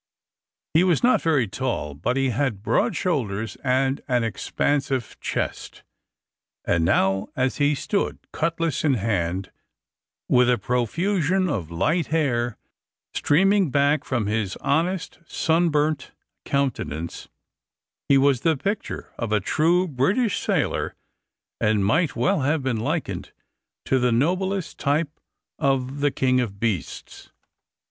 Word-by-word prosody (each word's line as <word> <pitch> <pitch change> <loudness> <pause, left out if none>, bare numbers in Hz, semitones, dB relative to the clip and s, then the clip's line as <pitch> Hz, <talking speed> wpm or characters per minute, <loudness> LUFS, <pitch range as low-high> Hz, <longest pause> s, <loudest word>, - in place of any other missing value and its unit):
He 160 +3 +5
was 180 0 +2
not 250 +1 +4
very 150 -8 +2
tall, 115 - -3
but 105 - -2
he 135 -1 +2
had 120 -5 -1
broad 110 +1 +1
shoulders 110 - -1
and 135 +1 +1
an 125 -3 +1
expansive 130 +2 -1
chest; - - -4 0.8
and 85 -1 +2
now, 95 +2 +2
as 130 0 0
he 145 0 +2
stood 200 +8 -1
cutlass 165 -2 -1
in 145 -4 +3
hand, 95 -4 -1 0.8
with 125 0 +4
a 125 - +3
profusion 170 - 0
of 95 - -2
light 155 - 0
hair 120 -7 0 0.6
streaming 195 +3 +3
back 145 +2 +2
from 120 -5 -1
his 105 -3 -1
honest 170 +5 -1
sunburnt 155 -3 +1 0.4
countenance, 125 - -2 0.8
he 140 - +6
was 135 -2 +3
the 160 -1 +2
picture 200 +8 -4
of 115 -2 -3
a 105 - +3
true 170 - +2
British 185 - +1
sailor, - - -1 0.6
and 105 -2 +2
might 160 - +2
well 195 -1 +2
have 145 +2 0
been 130 -3 0
likened 110 - -3 0.5
to 130 - +2
the 125 0 +2
noblest 185 +9 0
type 150 +2 0 0.4
of 135 -1 0
the 145 0 +3
king 130 -2 +1
of 100 -5 -4
beasts. 105 -7 -4
135 Hz, 125 wpm, -24 LUFS, 115-160 Hz, 0.8 s, he